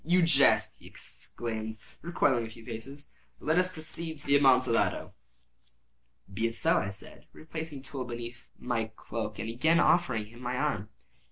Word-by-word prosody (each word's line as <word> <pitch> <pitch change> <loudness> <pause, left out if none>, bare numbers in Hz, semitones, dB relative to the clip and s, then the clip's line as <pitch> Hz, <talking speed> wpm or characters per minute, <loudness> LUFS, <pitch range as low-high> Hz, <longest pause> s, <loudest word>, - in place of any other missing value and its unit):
"You 175 +2 +4
jest," 150 -4 +5
he - - -14
exclaimed, 110 -1 -5 0.2
recoiling 140 -7 +2
a 115 - -5
few 115 0 -13
paces. 135 +5 -6 0.2
"But - - -15
let 160 +3 +5
us 180 0 +2
proceed 160 0 -5
to 145 - -7
the 140 - +4
Amontillado." 130 -4 +3 1.2
"Be 110 +3 +1
it 115 - -5
so," - - +3
I 100 - -2
said, 95 - -11
replacing 155 -3 -6
the - - -14
tool 130 -1 -4
beneath 120 0 -7
the 115 -3 -1
cloak, 110 -2 -4
and - - -4
again 155 +9 +3
offering 125 -12 +3
him 120 +3 -14
my 125 0 -2
arm. 125 -7 -1
125 Hz, 170 wpm, -30 LUFS, 115-155 Hz, 1.2 s, jest